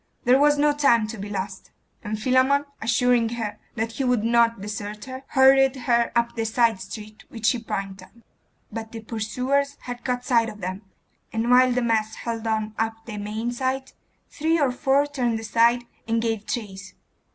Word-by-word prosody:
There 250 +2 +5
was 295 0 +4
no 295 0 +3
time 255 -6 +3
to 225 - -6
be 205 +1 -6
lost; 195 -1 -5 0.3
and 215 0 -3
Philammon, 260 +4 +3 0.2
assuring 235 0 +2
her 215 -3 -4 0.2
that 225 0 -2
he 270 - -3
would 250 -4 +1
not 230 -1 +3
desert 210 +1 -6
her, 260 0 -7
hurried 270 0 +5
her 235 -2 +1
up 235 0 +1
the 225 - -1
side 225 -2 +2
street 210 +2 -9
which 225 -1 -6
she 245 - +3
pointed 195 -4 -5
out. - - -25 0.6
But 225 +1 -6
the 225 - -6
pursuers 255 +6 -1
had 245 -1 -7
caught 250 -1 -2
sight 230 -3 +3
of 210 -1 -10
them, 185 +1 -4 0.5
and 230 +2 0
while 255 0 +6
the 250 0 0
mass 220 -2 0
held 230 -1 -4
on 215 -1 -1
up 225 0 -2
the 210 -3 -6
main 215 +3 -3
sight, 260 +1 -2 0.4
three 325 +2 +1
or 280 -4 +2
four 270 +3 +2
turned 250 -6 -1
aside 230 +2 +2 0.2
and 230 0 +1
gave 225 -2 -2
chase. 200 -4 -5
230 Hz, 185 wpm, -24 LUFS, 215-255 Hz, 0.6 s, while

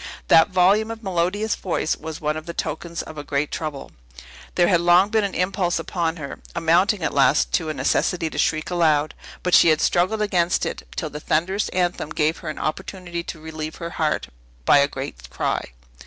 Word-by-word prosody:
That 160 +5 +7
volume 195 +4 +3
of 225 0 -7
melodious 190 +3 0
voice 170 -4 -1
was 160 0 -7
one 150 0 -1
of 155 +1 -7
the 170 - -6
tokens 170 +2 -4
of 155 -1 -9
a - - -5
great 145 0 -1
trouble. 150 -4 -5 0.6
There 175 - +4
had 175 -3 +3
long 175 +3 +5
been 220 0 +2
an 200 - -2
impulse 180 -1 0
upon 170 -2 -2
her 140 -4 -7 0.2
amounting, 175 +4 +2
at - - -1
last, 140 +1 +3
to 160 -3 0
a - - -1
necessity 175 -2 +1
to - - -5
shriek 155 +2 0
aloud; 155 -4 +2 0.3
but 180 - -1
she - - +7
had 155 -1 +3
struggled 185 +7 +2
against 180 -4 +1
it, - - -5
till 155 -3 -3
the 150 - -6
thunderous 180 +7 0
anthem 180 -4 -1
gave 155 +1 0
her 165 - -6
an 155 - -5
opportunity 175 +1 -4
to 165 - -7
relieve 155 0 -6
her 170 -1 -6
heart 155 -3 -1 0.4
by 145 - +6
a 140 - +4
great 130 - -7
cry. - - -2
170 Hz, 200 wpm, -23 LUFS, 155-185 Hz, 0.6 s, That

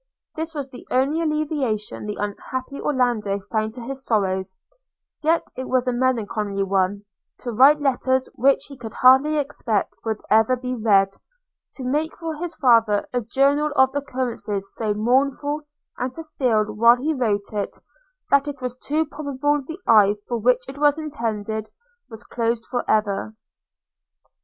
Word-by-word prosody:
This 320 +1 -5
was 275 -3 -5
the 245 - -12
only 275 +6 +1
alleviation 295 -10 -2
the 210 - -3
unhappy 255 +6 -4
Orlando 240 -7 0
found 220 0 -1
to 245 - -7
his 270 +2 -6
sorrows; 190 -4 -1 0.6
yet 320 +2 +2
it 260 - -5
was 255 0 +1
a 250 - +1
melancholy 215 -5 0
one, 195 +1 0 0.4
to 245 - -4
write 275 +6 +6
letters 260 -2 +1
which 275 +3 +2
he 280 - -11
could 230 -4 -9
hardly 265 +4 +5
expect 235 -7 -1
would 220 -2 -2
ever 220 +4 +4
be 250 0 -4
read, 200 -4 +3 0.6
to 265 - -7
make 300 +5 -1
for 325 -1 -4
his 340 +1 -5
father 225 -7 +4
a 245 - +1
journal 280 +6 +2
of 265 -1 +4
occurrences 245 -8 -3
so 220 -2 -2
mournful, 275 +6 +1 0.4
and 250 +1 -1
to 325 - -7
feel, 250 -8 +1
while 215 +3 +5
he 290 +6 -1
wrote 215 -7 -1
it, 205 -1 -3 0.5
that 280 +1 +4
it 285 -2 -5
was 250 -2 -4
too 305 +5 -1
probable 290 -1 -1
the 320 +7 -8
eye 210 -2 +6
for 240 - -1
which 250 +2 +2
it 270 +1 -9
was 295 0 +4
intended 220 -8 -3 0.4
was 225 0 -10
closed 230 -1 -2
for 245 -1 -2
ever. 215 0 0
250 Hz, 155 wpm, -23 LUFS, 215-280 Hz, 0.6 s, write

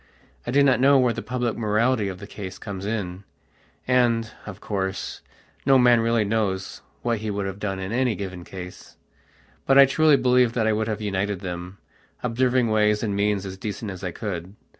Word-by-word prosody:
I - - -2
do 140 +3 +4
not 135 -2 +4
know 140 +2 +6
where 125 -2 +3
the - - -5
public 120 0 -2
morality 110 +1 +1
of 95 -1 -5
the 100 - -9
case 100 -2 -8
comes 100 -2 -6
in, 100 -4 -3 0.6
and, 120 -3 +2 0.2
of 105 -1 -8
course, 95 -2 -3 0.4
no 135 0 +5
man 120 -2 +5
really 115 -1 +2
knows 100 -3 -2 0.2
what 120 -2 0
he 110 0 -4
would 100 -1 -2
have 95 +1 -5
done 100 -2 -2
in 95 +1 -5
any 125 -1 +1
given 95 -2 -6
case. 90 0 -10 0.7
But 135 - +5
I 140 - +10
truly 150 +2 +4
believe 125 -2 +3
that 115 -3 0
I 110 - +3
would 110 0 -1
have 110 -1 -3
united 100 -1 -2
them, 90 +1 -6 0.5
observing 125 0 +1
ways 105 0 +2
and 105 -3 -1
means 100 -1 0
as 95 0 -7
decent 105 0 -5
as 95 0 -9
I 90 - -1
could. 95 -1 -6
105 Hz, 195 wpm, -24 LUFS, 95-120 Hz, 0.7 s, I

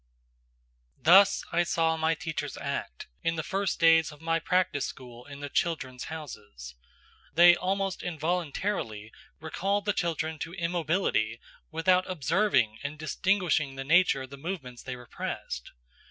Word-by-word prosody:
Thus 190 +4 +6
I 170 - +3
saw 165 -1 +1
my 160 0 +1
teachers 155 -3 -4
act - - -4 0.2
in 165 - 0
the 160 - -2
first 195 +1 -1
days 165 -1 +5
of 150 - -14
my 165 +1 0
practice 180 -4 +1
school 125 -2 -10
in 140 0 -10
the 145 - -4
"Children's 130 -5 -2
Houses." 105 - -8 0.6
They 175 +1 +8
almost 195 +1 -1
involuntarily 160 - -2 0.3
recalled 195 +6 -1
the 205 - +2
children 160 -3 -2
to 165 +3 -5
immobility 170 - 0 0.3
without 180 +3 +2
observing 150 - +1
and 145 +2 -5
distinguishing 155 -3 0
the 135 - -5
nature 155 -2 +4
of 130 - -11
the 140 - -8
movements 135 -6 -6
they 130 - -6
repressed. 120 - -6
160 Hz, 140 wpm, -28 LUFS, 135-180 Hz, 0.6 s, They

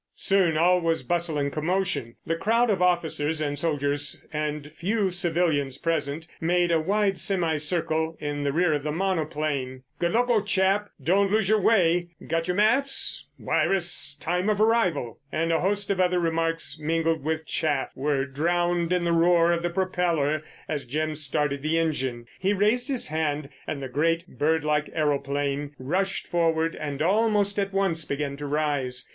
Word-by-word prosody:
Soon 185 -5 +2
all 180 +2 +4
was 165 -4 0
bustle 170 +2 0
and 140 -1 -1
commotion. 155 -7 -1
The 165 - 0
crowd 225 +6 +2
of 190 -3 0
officers 160 -3 +1
and 145 -2 -2
soldiers 145 -3 -1
and 150 -1 -3
few 195 +4 -1
civilians 165 -6 0
present 160 -2 -2
made 175 +1 +1
a 165 - +3
wide 195 +3 +1
semi 170 -5 +1
circle 160 0 -1
in 145 -1 -3
the 140 - 0
rear 170 +2 +2
of 145 - -1
the 150 +1 -3
monoplane. 150 -7 -2 0.2
"Good 170 0 0
luck, 245 +2 +2
old 215 -4 +1
chap!" 195 +1 +2
"Don't 195 +3 +3
lose 215 -2 +2
your 215 -1 +3
way!" 175 -5 +3 0.2
"Got 165 +1 -1
your 180 - 0
maps?" 265 +6 +2
"Wire 195 - +1
us 170 -5 +2
time 180 +4 -1
of 210 -1 +1
arrival!"—and 165 - 0
a 165 - +2
host 200 +1 0
of 195 - -1
other 180 0 +2
remarks, 165 -1 0
mingled 165 0 0
with 160 +1 -2
chaff, 145 -2 -1
were 140 0 0
drowned 175 +4 0
in 180 -1 +1
the 170 0 +1
roar 170 0 +4
of 170 0 0
the 175 - -1
propeller 170 -5 0 0.3
as 150 -3 -3
Jim 155 +5 -2
started 145 -1 -1
the 155 +3 0
engine. 130 -7 -1
He 195 +2 +1
raised 215 +6 +1
his 265 - +1
hand 150 -2 -2 0.2
and 140 -3 -4
the - - -3
great, 165 +6 0
bird 160 +1 +2
like 150 0 0
aeroplane 145 -1 -1
rushed 185 +9 -2
forward 165 -1 0
and 145 -1 -3
almost 205 +1 +2
at 195 0 -1
once 190 -5 0
began 140 -1 -3
to 145 0 -5
rise. 145 -4 -1
165 Hz, 170 wpm, -25 LUFS, 150-180 Hz, 0.3 s, all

